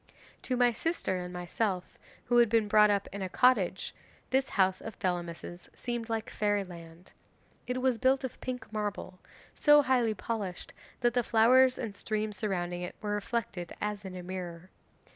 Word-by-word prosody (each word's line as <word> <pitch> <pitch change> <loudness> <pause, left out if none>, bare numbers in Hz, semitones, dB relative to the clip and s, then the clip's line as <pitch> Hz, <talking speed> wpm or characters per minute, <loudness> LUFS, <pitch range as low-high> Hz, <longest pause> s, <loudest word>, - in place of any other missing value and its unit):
'To 255 - -1
my 245 -1 +5
sister 235 - -1
and 180 0 -6
myself, 180 +2 -3 0.3
who 240 0 +4
had 235 -2 +5
been 225 -1 +3
brought 210 0 +6
up 200 -1 +1
in 200 - -5
a 190 - -2
cottage, 200 -4 +2 0.4
this 265 +1 +2
house 190 -1 +3
of 225 -2 -7
Thelamis's 175 -1 -4
seemed 240 -2 -4
like 225 -1 -2
fairyland. 180 -5 -3 0.6
It 250 0 -2
was 255 -3 +2
built 265 +1 +3
of 260 - -6
pink 250 -3 -5
marble, 205 -3 -4 0.3
so 295 -1 +6
highly 245 -5 +2
polished 200 -4 -4 0.3
that 240 -1 +3
the 245 - +3
flowers 250 +3 +5
and 220 -5 -5
streams 215 -1 -3
surrounding 180 -3 -2
it 180 - -5
were 210 -1 -3
reflected 205 -4 -3
as 210 -1 -3
in 190 -1 -7
a 180 - -6
mirror. 180 -1 -7
210 Hz, 165 wpm, -30 LUFS, 185-240 Hz, 0.6 s, brought